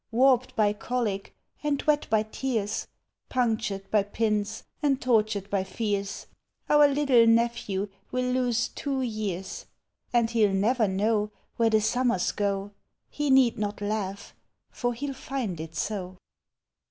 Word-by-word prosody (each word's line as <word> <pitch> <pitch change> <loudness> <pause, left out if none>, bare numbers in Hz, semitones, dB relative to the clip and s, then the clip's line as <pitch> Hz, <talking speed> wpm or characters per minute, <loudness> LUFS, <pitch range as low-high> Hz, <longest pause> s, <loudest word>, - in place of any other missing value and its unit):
Warped 255 +1 +3
by 210 -1 +3
colic, 210 -3 -3 0.3
and 295 -2 0
wet 300 -1 +2
by 215 -1 +3
tears. 220 -2 -2 0.4
Punctured 220 -6 -1
by 210 - +4
pins, 210 +1 -1 0.2
and 280 -3 +2
tortured 215 -5 +1
by 195 -2 +1
fears, 200 0 -3 0.4
Our 295 -1 +6
little 275 -5 +4
nephew 230 -4 +1 0.2
will 255 0 0
lose 245 -2 +1
two 270 -2 -2
years; 210 -6 -4 0.4
And 235 -2 +2
he 235 - -1
Ml 205 -3 +4
never 220 +3 +2
know 210 +2 +1 0.3
Where 230 -1 +4
the 220 -1 +3
summers 235 -3 +1
go;— 200 -1 -2 0.4
He 295 -1 -1
need 265 -4 +5
not 205 -1 -2
laugh, 205 -1 -3 0.4
for 245 -1 -2
he 270 +5 -4
'11 275 -1 -6 0.4
tiud - - -13
it 160 0 -7
so! 185 +1 -3
220 Hz, 140 wpm, -27 LUFS, 205-250 Hz, 0.4 s, Our